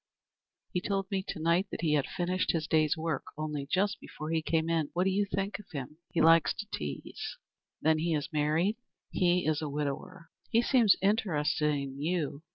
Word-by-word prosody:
He 180 Hz, -, 0 dB
told 195 Hz, 0 st, -2 dB
me 195 Hz, -1 st, +1 dB
to -, -, -4 dB
night 170 Hz, +4 st, +2 dB
that -, -, -5 dB
he 160 Hz, -3 st, +2 dB
had 145 Hz, -3 st, +2 dB
finished 180 Hz, +1 st, 0 dB
his 160 Hz, -2 st, 0 dB
day's 155 Hz, -2 st, +2 dB
work 160 Hz, -3 st, -2 dB
only 150 Hz, -2 st, -3 dB
just 195 Hz, +2 st, +1 dB
before 155 Hz, +1 st, -7 dB
he 165 Hz, -1 st, +1 dB
came 160 Hz, 0 st, 0 dB
in. 165 Hz, -3 st, +1 dB
What 180 Hz, -, +2 dB
did 190 Hz, -, +2 dB
you 200 Hz, +2 st, +2 dB
think 195 Hz, +1 st, -2 dB
of 210 Hz, -, -14 dB
him? 145 Hz, 0 st, -6 dB
He 170 Hz, -, 0 dB
likes 165 Hz, 0 st, +5 dB
to 205 Hz, -, -5 dB
tease." 75 Hz, -2 st, -5 dB, 0.5 s
"Then 160 Hz, 0 st, +4 dB
he 165 Hz, 0 st, +1 dB
is 150 Hz, +2 st, -3 dB
married?" 155 Hz, +8 st, +2 dB, 0.3 s
"He 180 Hz, -1 st, +2 dB
is 155 Hz, 0 st, +1 dB
a 155 Hz, -, -2 dB
widower." 150 Hz, +5 st, -4 dB, 0.2 s
"He 230 Hz, 0 st, +3 dB
seems 235 Hz, -7 st, +5 dB
interested 160 Hz, -8 st, +2 dB
in 140 Hz, -1 st, -5 dB
you. 155 Hz, -3 st, -1 dB
165 Hz, 195 wpm, -30 LUFS, 150-185 Hz, 0.5 s, likes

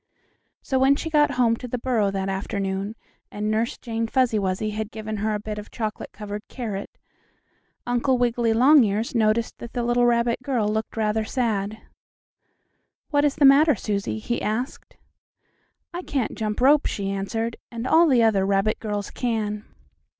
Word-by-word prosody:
So 265 Hz, -, 0 dB
when 270 Hz, +2 st, +5 dB
she 320 Hz, +2 st, -5 dB
got 295 Hz, -2 st, +3 dB
home 235 Hz, -2 st, +3 dB
to 250 Hz, -, -7 dB
the 250 Hz, -, -3 dB
burrow 230 Hz, -4 st, +1 dB
that 195 Hz, -1 st, -2 dB
afternoon, 195 Hz, +1 st, -3 dB, 0.3 s
and 210 Hz, +1 st, -3 dB
Nurse 225 Hz, +2 st, 0 dB
Jane 230 Hz, -1 st, -3 dB
Fuzzy 245 Hz, -3 st, +2 dB
Wuzzy 195 Hz, +2 st, -1 dB
had 215 Hz, 0 st, -4 dB
given 215 Hz, -1 st, -5 dB
her 215 Hz, +1 st, -1 dB
a -, -, -2 dB
bit 210 Hz, 0 st, -5 dB
of 210 Hz, -, -10 dB
chocolate 215 Hz, -2 st, -5 dB
covered 210 Hz, 0 st, -6 dB
carrot, 215 Hz, -6 st, -6 dB, 0.9 s
Uncle 245 Hz, +2 st, +1 dB
Wiggily 240 Hz, -1 st, +1 dB
Longears 230 Hz, -3 st, +4 dB
noticed 225 Hz, 0 st, +1 dB
that 235 Hz, -, -9 dB
the 245 Hz, -, -1 dB
little 240 Hz, 0 st, +3 dB
rabbit 235 Hz, 0 st, +1 dB
girl 250 Hz, -5 st, 0 dB
looked 220 Hz, +1 st, -3 dB
rather 220 Hz, 0 st, +1 dB
sad. 220 Hz, -3 st, -2 dB, 1.3 s
"What 290 Hz, -1 st, +3 dB
is 290 Hz, -1 st, +2 dB
the 290 Hz, -, +4 dB
matter, 290 Hz, +2 st, +6 dB
Susie?" 200 Hz, 0 st, -2 dB
he 235 Hz, +2 st, -3 dB
asked. 235 Hz, +5 st, -4 dB, 1.0 s
"I 350 Hz, -, -4 dB
can't 275 Hz, -8 st, -2 dB
jump 215 Hz, 0 st, -3 dB
rope," 280 Hz, +3 st, +5 dB
she 195 Hz, -1 st, -3 dB
answered, 225 Hz, +4 st, -3 dB
"and 235 Hz, 0 st, -5 dB
all 330 Hz, +6 st, +5 dB
the 250 Hz, -5 st, +4 dB
other 210 Hz, -4 st, +3 dB
rabbit 195 Hz, +2 st, +1 dB
girls 205 Hz, -2 st, -4 dB
can." 215 Hz, -3 st, -2 dB
225 Hz, 165 wpm, -24 LUFS, 210-245 Hz, 1.3 s, matter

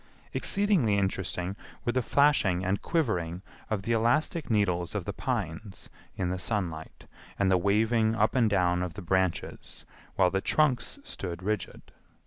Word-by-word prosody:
Exceedingly 190 Hz, -, +2 dB
interesting 95 Hz, -1 st, -1 dB, 0.3 s
were 120 Hz, -, +2 dB
the 130 Hz, -, +1 dB
flashing 115 Hz, -10 st, +3 dB
and 95 Hz, +2 st, 0 dB
quivering 95 Hz, -, -1 dB, 0.3 s
of 105 Hz, -3 st, -2 dB
the 115 Hz, -, -2 dB
elastic 120 Hz, +8 st, +1 dB
needles 90 Hz, -6 st, +1 dB
of -, -, -2 dB
the -, -, -3 dB
pines 90 Hz, +5 st, -4 dB, 0.3 s
in 90 Hz, -2 st, -1 dB
the 90 Hz, -, -3 dB
sunlight 90 Hz, -6 st, -4 dB, 0.3 s
and 95 Hz, -1 st, +2 dB
the 95 Hz, -, +5 dB
waving 110 Hz, +3 st, +2 dB
up 110 Hz, 0 st, +2 dB
and 120 Hz, -4 st, +3 dB
down 90 Hz, -3 st, +2 dB
of 90 Hz, -2 st, -4 dB
the 100 Hz, -, -7 dB
branches 95 Hz, 0 st, -2 dB, 0.3 s
while 90 Hz, -2 st, +3 dB
the 95 Hz, +1 st, 0 dB
trunks 150 Hz, -, +1 dB
stood 90 Hz, -, -6 dB
rigid. 105 Hz, +2 st, -4 dB
100 Hz, 150 wpm, -28 LUFS, 90-115 Hz, 0.3 s, the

